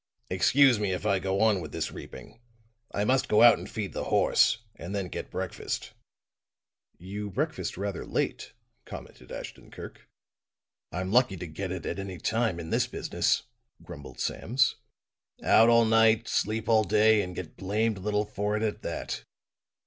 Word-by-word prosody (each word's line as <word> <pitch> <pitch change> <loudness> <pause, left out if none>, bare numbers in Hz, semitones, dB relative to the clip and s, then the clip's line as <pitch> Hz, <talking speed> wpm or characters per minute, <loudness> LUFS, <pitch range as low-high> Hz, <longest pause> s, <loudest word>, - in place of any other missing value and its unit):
"Excuse 135 -4 +5
me 100 -3 0
if 90 - -4
I 100 - +2
go 95 +2 -1
on 110 -4 +3
with 80 -3 -7
this - - -3
reaping. 110 - -11 0.5
I 100 - -1
must 130 +4 +2
go 105 +2 +5
out 120 - +8
and - - -8
feed 105 -3 -4
the - - -3
horse, - - +3 0.2
and 90 +5 -6
then 95 -3 -2
get - - -6
breakfast." - - -4 1.0
"You 100 +4 -6
breakfast 95 - -3
rather 100 -2 -3
late," - - -3 0.3
commented 60 - -11
Ashton - - -8
Kirk. - - -11 0.8
"I'm 95 +2 -3
lucky 120 -5 +3
to 90 - -6
get 90 +4 -5
it 95 -3 -5
at - - -3
any 95 -2 -6
time, 110 -2 0
in 80 -1 -7
this - - +2
business," - - 0 0.4
grumbled 70 - -10
Sams. 125 +4 +1 0.7
"Out 115 +1 +6
all 115 0 +6
night, 110 0 +4
sleep 110 +1 -1
all 110 -1 +4
day, 110 0 +4
and 90 -1 -6
get 90 -4 -7
blamed 105 +2 -1
little 105 +2 0
for 105 0 -2
it, 110 - -2
at 110 -1 -2
that." - - -4
105 Hz, 165 wpm, -28 LUFS, 95-110 Hz, 1.0 s, out